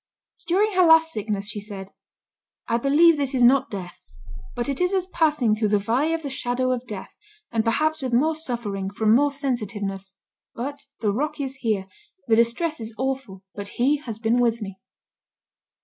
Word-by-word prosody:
During 400 +5 +3
her 365 0 +5
last 325 -1 +6
sickness 210 -5 -3
she 210 0 -4
said, 200 -2 -8 0.8
"I 230 - +2
believe 300 +5 +5
this 275 -2 -1
is 250 - +3
not 265 +2 +5
death, 185 -3 -7 0.5
but 240 -1 -2
it 280 +3 -2
is 360 +2 +2
as 370 -1 +1
passing 300 - +2
through 215 0 0
the 210 0 +3
valley 250 +11 +1
of 325 - -6
the 280 - -3
shadow 255 0 -1
of 250 0 -3
death, 200 -3 -7 0.4
and 225 -2 +1
perhaps 310 +7 +1
with 260 -2 -2
more 290 +7 +3
suffering, 235 -10 -4
from 215 +2 +2
more 285 +4 +4
sensitiveness; 205 -8 -4 0.4
but 275 +4 -5 0.2
the 210 -2 +2
'rock 300 +8 -2
is 270 -1 -4
here'; 215 -7 -1 0.4
the 225 - +4
distress 235 +8 +1
is 220 0 -7
awful, 265 -7 -3
but 200 0 -7
He 275 +5 +3
has 240 -7 -7
been 225 +1 +1
with 235 -1 +2
me." 195 -3 -7
245 Hz, 180 wpm, -24 LUFS, 215-290 Hz, 0.8 s, last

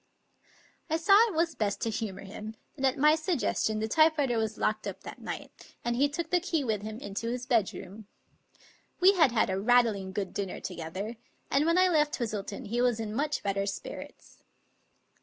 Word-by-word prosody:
I 320 - +2
saw 340 +5 +3
it 410 - -5
was 330 0 +1
best 210 -6 -1
to 225 - 0
humor 205 -3 -4
him, 215 +2 -8 0.2
and 270 -2 +1
at 260 - 0
my 300 +2 +6
suggestion 310 - 0
the 220 +1 -1
typewriter 290 -3 +3
was 220 -1 -2
locked - - -1
up - - -6
that - - -10
night, - - -8
and 240 0 0
he 280 +4 +3
took 325 +2 -4
the 360 - +4
key 335 -4 -1
with 220 -5 -1
him 215 +1 -6
into 210 -1 -5
his 250 +1 -3
bedroom. 210 -4 -1 0.9
We 375 +2 +7
had 325 -9 +4
had 220 -4 +2
a 190 - -1
rattling 220 -4 +3
good 195 -1 -3
dinner 195 -2 -3
together, 185 +6 -5 0.3
and 285 +3 +3
when 335 +1 +3
I 370 0 +6
left 300 -4 +2
Twistleton 210 -4 -4
he 240 +2 0
was 245 -2 +2
in 215 -1 -4
much 295 +5 -1
better 195 0 -1
spirits. 195 - -8
235 Hz, 190 wpm, -29 LUFS, 205-300 Hz, 0.9 s, We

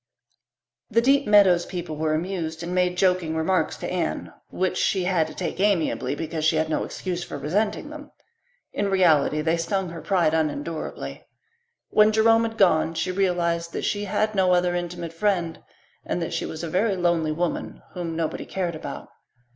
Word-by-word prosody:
The 230 - +3
Deep 275 +3 +3
Meadows 195 -4 +5
people 175 -4 -5
were 155 0 0
amused 165 -1 -3
and 175 +1 -4
made 180 0 +1
joking 180 -4 +2
remarks 170 +4 0
to - - -5
Anne, - - -2 0.2
which 185 0 -1
she 190 -2 +1
had 180 -4 +1
to 155 - -10
take 180 - -4
amiably 165 -9 +1
because 160 0 -4
she 160 +1 +3
had 155 0 0
no 155 - 0
excuse 180 -2 -4
for 160 - -6
resenting 205 - -1
them. 300 -1 -9 0.6
In 200 0 -1
reality 160 -5 +3
they 160 +2 +1
stung 190 +2 -1
her 165 -1 -8
pride 175 -5 +2
unendurably. 155 0 -3 0.6
When 215 0 +5
Jerome 225 +1 +4
had 225 0 -5
gone 165 -4 +3
she 185 - -1
realized 170 -3 0
that - - -3
she 205 0 -1
had 215 +2 0
no 185 -2 +3
other 175 0 +2
intimate 175 -1 -4
friend 175 -3 -1 0.4
and - - -2
that - - -3
she - - -2
was 160 +1 -6
a - - -2
very 195 +5 +1
lonely 170 -3 +1
woman 170 +2 -3
whom 170 -2 -4
nobody 160 -1 -3
cared 180 -3 -2
about. 155 - -7
175 Hz, 180 wpm, -24 LUFS, 160-195 Hz, 0.6 s, Meadows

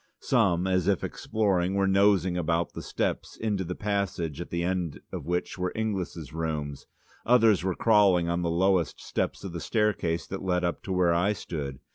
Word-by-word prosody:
Some, 90 -1 +2
as 95 -1 +1
if 100 -3 +2
exploring, 95 -4 0
were 100 0 +2
nosing 95 -2 +3
about 85 0 0
the - - -6
steps - - -3
into 105 -4 -1
the 90 +1 -4
passage 95 -6 -2
at - - -7
the 85 0 -2
end 90 -3 -2
of - - -6
which 90 +1 -2
were 90 0 -1
Inglis' 95 -8 -3
rooms, 75 -3 -4 0.4
others 115 -5 +4
were 95 -2 0
crawling 100 -6 +4
on 85 +1 0
the 85 - 0
lowest 90 0 +1
steps - - -3
of 95 -4 -6
the 85 - -4
staircase 95 -4 0
that 95 - -6
led 90 -1 0
up 85 - -1
to 95 - -4
where 90 -2 +3
I 95 +5 +2
stood. 70 -8 -5
90 Hz, 185 wpm, -27 LUFS, 85-100 Hz, 0.4 s, others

